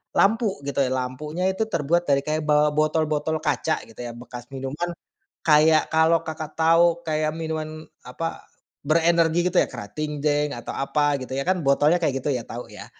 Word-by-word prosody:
lampu, 215 0 +2
gitu 140 - -2
ya, 130 - 0
lampunya 130 +7 -3
itu 190 +4 -1
terbuat 170 0 +1
dari 140 0 +3
kayak 155 +1 -1
ba 150 0 +4
botol-botol 155 0 +1
kaca, 160 - 0
gitu 115 - -17
ya, 120 - -5
bekas 120 0 -10
minuman. 140 +6 -4 0.6
Kayak, 155 0 +5
kalau 160 +1 +4
Kakak 155 -1 -6
tahu 165 +1 +4
kayak 155 -1 0
minuman, 155 -1 -5 0.2
apa, 165 +7 -5 0.4
berenergi, 170 +2 +3
gitu - - +1
ya, - - +1
Kratingdaeng, 145 +5 -2
atau 120 - -6
apa, 145 +1 +1
gitu 130 +1 -6
ya, 140 - -1
kan, 185 -2 +1
botolnya 145 +5 +4
kayak 135 -4 0
gitu - - +1
ya, 125 - -2
tahu 120 +1 -6
ya. 105 - -9
155 Hz, 170 wpm, -24 LUFS, 140-165 Hz, 0.6 s, Kayak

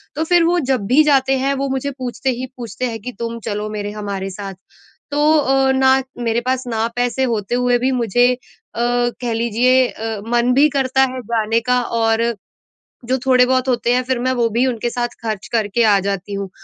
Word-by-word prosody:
तो 315 - -1
फिर 345 +1 +3
वो 350 +1 +2
जब 245 -7 +1
भी 285 +6 +5
जाते 270 -2 +3
हैं, 275 +1 0
वो 275 0 -2
मुझे 270 +1 -2
पूछते 255 +1 -3
ही 255 +1 -2
पूछते 240 +1 -5
हैं 225 -1 -5
कि 250 - -6
तुम 230 0 -4
चलो 210 0 -3
मेरे 205 -1 -4
हमारे 200 -2 -4
साथ। 195 0 -7 0.6
तो 290 - -1 0.2
अ, 270 -1 +2
ना 265 0 +4 0.2
मेरे 230 0 0
पास 260 +1 -1
ना 225 -1 -1
पैसे 245 +2 0
होते 230 -2 -1
हुए 245 0 +2
भी 260 +2 +1
मुझे 245 0 +2
अ, - - -7 0.4
कह 240 0 0
लीजिए 240 +3 +2
अ, 220 -2 -5
मन 240 +1 +2
भी 285 +3 +5
करता 265 -1 +1
है 255 - -5
जाने 225 0 0
का, 250 +1 +1
और 225 -1 0 0.8
जो 260 +2 0
थोड़े 255 -1 +5
बहुत 260 0 +1
होते 240 0 +1
हैं, 250 - +2
फिर 255 -1 -1
मैं 255 +1 0
वो 235 -2 +1
भी 235 +4 +1
उनके 240 -1 -2
साथ 240 0 -2 0.2
ख़र्च 215 -3 -4
करके 225 +1 +1
आ 205 -2 +4
जाती 200 0 -3
हूँ। 195 -1 -4
245 Hz, 205 wpm, -19 LUFS, 225-260 Hz, 0.8 s, भी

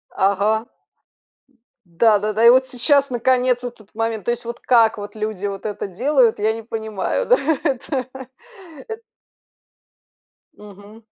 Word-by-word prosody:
Ага. 205 +4 +1 1.1
Да-да-да. 215 +4 +2
И 235 - +10
вот 260 +1 +4
сейчас, 280 +3 +2
наконец, 250 0 +1
этот 235 -4 -10
момент. 225 -2 -3
То 240 - +1
есть 240 0 -4
вот 235 0 -6
как 230 -3 +3
вот 205 +1 -8
люди 215 -2 -4
вот 195 -1 -7
это 210 -1 -4
делают, 240 +4 +1
я 215 +1 +1
не 225 - -7
понимаю, 220 - -3
да, - - +5 0.3
это. 265 -3 -2 0.8
Эт 445 0 -7 1.6
Мгм. 205 +2 -14
225 Hz, 130 wpm, -20 LUFS, 210-250 Hz, 1.6 s, И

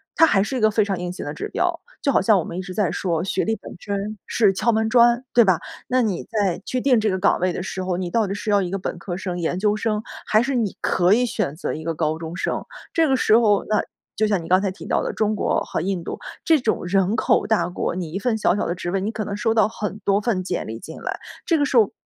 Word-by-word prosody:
它 325 - +7
还 200 -11 +3
是 215 +7 -2
一 - - -1
个 215 0 +4
非 215 -1 +3
常 195 -2 -2
硬 180 0 -3
性 185 - -6
的 - - -3
指 - - -5
标。 - - 0 0.2
就 280 - +2
好 - - +3
像 200 0 +4
我 - - -1
们 170 - -6
一 185 - -2
直 185 0 -7
在 205 -4 +1
说 170 -3 -1
学 190 - 0
历 225 - 0
本 - - -11
身 205 +1 -4
是 210 -4 +3
敲 235 +5 +1
门 220 0 +1
砖， 240 +1 +4
对 235 - +7
吧？ 190 -5 +3 0.3
那 255 0 +2
你 210 -7 -1
在 200 -5 -1
去 255 - -1
定 250 -3 +3
这 215 -1 +1
个 185 - -1
岗 200 - +3
位 185 +1 +1
的 180 - -4
时 185 0 -4
候， 180 -1 -1
你 180 -2 -3
到 220 +2 +1
底 195 - -3
是 210 +1 -4
要 205 -1 +4
一 180 - -2
个 195 - -1
本 180 - -4
科 175 0 -5
生、 180 -2 -4
研 175 +2 -1
究 210 0 +2
生， 215 0 -1 0.2
还 215 - +3
是 265 +3 -1
你 225 -5 -1
可 180 +1 +3
以 245 +3 +3
选 200 - -2
择 165 - -3
一 155 - -6
个 165 - -2
高 155 0 0
中 165 +1 -7
生？ - - -2 0.3
这 330 -1 +3
个 265 - +4
时 220 -2 +4
候， 210 -4 +3
那 215 - +2 0.3
就 215 - +2
像 200 -4 +1
你 - - -8
刚 185 +2 +4
才 195 -2 -1
提 190 - -11
到 - - +1
的 - - -2
中 215 0 0
国 - - +1
和 - - -3
印 185 -1 -2
度， - - -6 0.3
这 320 -4 +5
种 215 -5 0
人 195 +3 +2
口 - - +2
大 205 -6 +2
国， 180 0 -3
你 170 -4 -4
一 195 - -2
份 225 +1 0
小 210 - +2
小 205 - -1
的 175 - -1
职 175 -1 -4
位， 195 0 0
你 210 +3 -2
可 220 -1 -4
能 200 - -4
收 225 +1 +1
到 220 -2 +4
很 210 -1 -5
多 200 +1 +3
份 205 -5 0
简 185 - -3
历 110 +1 -6
进 160 - -9
来， - - -4 0.3
这 330 - +3
个 290 - +2
时 265 - -2
候， 215 -4 +5
200 Hz, 315 characters per minute, -22 LUFS, 180-220 Hz, 0.3 s, 它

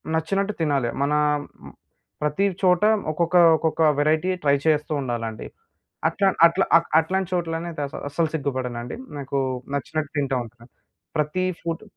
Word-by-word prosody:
నచ్చినట్టు 195 +6 0
తినాలి. 140 -6 +1
మన 140 +1 +1 1.1
ప్రతి 150 +7 +1 0.2
చోట 180 0 +3 0.3
ఒక్కొక్క 170 +3 -1 0.2
ఒక్కొక్క 160 +1 -1 0.2
వేరైటీ 155 +4 +2
ట్రై 140 -1 +4
చేస్తూ 155 -1 +1
ఉండాలండి. 115 -4 -4 0.6
అట్లా 195 +5 +1 0.2
అట్లా 180 +3 0 0.3
అట్లాంటి 185 +3 -1
చోట్లనే 170 -1 -2 0.2
అస 140 - -10 0.2
అసలు 160 +2 0
సిగ్గుపడనండి. 130 -5 -3 0.2
నాకు 140 0 -2 0.4
నచ్చినట్టు 150 +2 -3
తింటా 135 -2 0
ఉంటాను. 120 +1 -17 0.5
ప్రతి 150 +5 0 0.2
ఫుడ్ 165 0 -4
155 Hz, 120 wpm, -23 LUFS, 140-170 Hz, 1.1 s, ట్రై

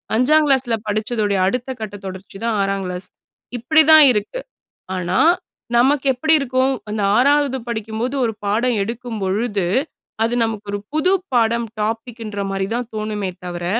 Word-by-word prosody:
5ங் 300 +6 +4
கிளாஸ்ல 260 -4 +2
படிச்சதோடய, 210 -1 0
அடுத்த 250 +5 -2
கட்டத் 205 -2 -7
தொடர்ச்சி 190 +1 -8
தான், 230 -1 0
6ங் 195 -1 -1
கிளாஸ். 180 +1 -5 0.5
இப்படி 310 +7 +4
தான் 315 -1 +9
இருக்கு. 215 - -2 0.6
ஆனா, 180 0 -1 0.6
நமக்கு 270 +3 +3
எப்படி 315 +6 +2
இருக்கும். 260 0 +1 0.2
அந்த 210 0 -2 0.2
6வது 280 0 +3
படிக்கும்போது 225 +3 -3
ஒரு 225 - -1
பாடம் 225 +4 +1
எடுக்கும்பொழுது, 215 -3 -2 0.6
அது 235 +2 -1
நமக்கு 220 -2 -4
ஒரு 205 - -2
புது 310 +5 +2 0.2
பாடம். 235 0 +2 0.2
டாப்பிக் 225 +2 -3
குன்ற 210 -3 -4
மாரி 195 0 -2
தான் 240 -1 -3
தோணுமே 215 -2 -3 0.2
தவர, 175 -1 -5
225 Hz, 145 wpm, -20 LUFS, 205-250 Hz, 0.6 s, தான்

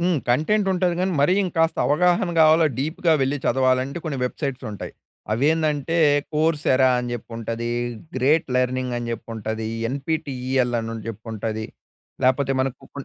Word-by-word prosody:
హ్మ్. 175 -2 +2
కంటెంట్ 160 - +2
ఉంటది 180 -1 +1
కానీ, 185 0 0
మరి 145 +5 +4
ఇంకాస్త 165 -2 +1
అవగాహన 180 +5 +2
కావాల 160 +1 +6
డీప్‌గా 160 +4 +1
వెళ్లి 135 +2 0
చదవాలంటే 130 +3 +1
కొన్ని 150 -4 -3
వెబ్‌సైట్స్ 135 0 -4
ఉంటాయి. 105 - -7 0.4
అవి 115 +5 0
ఏందంటే 155 -1 0 0.4
కోర్స్ఎరా 150 -4 +3
అని 120 0 -3
జెప్పి 120 0 -6
ఉంటది, 115 +1 -3 0.5
గ్రేట్ 145 +5 +3
లెర్నింగ్ 125 0 0
అని 120 - -5
జెప్పి 115 0 -6
ఉంటది, 110 0 -4 0.2
ఎన్‌పీటీఈఎల్ 130 -3 -1
అని 115 0 -5
జెప్పి 110 +1 -8
ఉంటది, 110 0 -3 0.6
లేకపోతే 130 +1 +2
మనకు 130 -1 -2
ఇప్పుడు 140 -1 -9
135 Hz, 145 wpm, -23 LUFS, 120-160 Hz, 0.6 s, కావాల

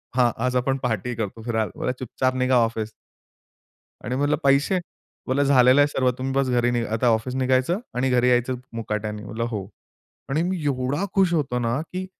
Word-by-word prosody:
हां 120 -2 +4
आज 125 - 0
आपण 135 +2 +1
पार्टी 120 0 -1
करतो 110 0 -4
फिरायला. 110 -2 -1
बोलला, - - 0
"चुपचाप 130 +1 -1
निघा 130 0 +2
ऑफिस." 115 -2 +1 1.1
आणि 125 +4 -2
म्हटलं, 145 +2 +2
"पैसे?" 140 +7 +3 0.5
बोला, 135 +2 +2
"झालेलं 130 0 +5
आहे 145 - +5
सर्व. 130 -3 +1
तुम्ही 130 +1 -3
बस 135 -1 +1
घरी 120 -1 +2
नही 120 -1 0
आता 115 +3 0
ऑफिस 115 +3 0
निघायचं 130 +8 +1 0.2
आणि 130 +1 +1
घरी 125 0 +3
यायचं 125 +1 +2 0.2
मुकाट्याने." 105 -1 -4
म्हणलं," 115 +3 -3
हो." 100 -3 -4 0.6
आणि 155 +5 +1
मी 185 -4 -3
एवढा 140 +5 0
खुश 190 -3 +3
होतो 135 -6 0
ना! 120 +3 0
की 185 +3 -5
125 Hz, 180 wpm, -24 LUFS, 115-135 Hz, 1.1 s, झालेलं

